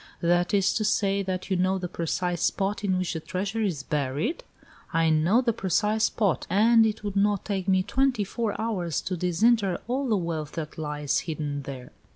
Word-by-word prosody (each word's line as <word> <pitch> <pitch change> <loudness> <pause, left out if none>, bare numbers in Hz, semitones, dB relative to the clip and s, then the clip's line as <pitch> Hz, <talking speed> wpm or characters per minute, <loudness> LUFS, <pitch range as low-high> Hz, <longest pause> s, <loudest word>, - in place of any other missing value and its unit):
"That 175 +1 +2
is 200 -2 +3
to 215 - 0
say, 200 -2 +1
that 185 0 -4
you - - +3
know 185 +1 +2
the 180 -1 -4
precise 175 +1 -2
spot 200 +1 0
in 190 -2 +1
which 185 -2 -1
the 160 - -3
treasure 195 +7 -3
is 175 -10 -1
buried?" 150 - -2 0.5
"I 165 -1 +2
know 170 +10 +3
the 235 -2 +1
precise 210 +2 +1
spot, 205 -7 0
and 225 +4 +5
it 215 0 -4
would 205 -1 -4
not 200 -1 +2
take 195 -2 -2
me 190 -1 +3
twenty 260 -1 +1
four 215 +1 -3
hours 190 -8 -1
to 185 - -3
disinter 190 +3 +2
all 260 +2 -1
the 215 - +3
wealth 165 -4 -3
that 160 -1 -6
lies 150 -2 -1
hidden 150 -3 -4
there." 130 -3 -8
190 Hz, 195 wpm, -26 LUFS, 165-210 Hz, 0.5 s, and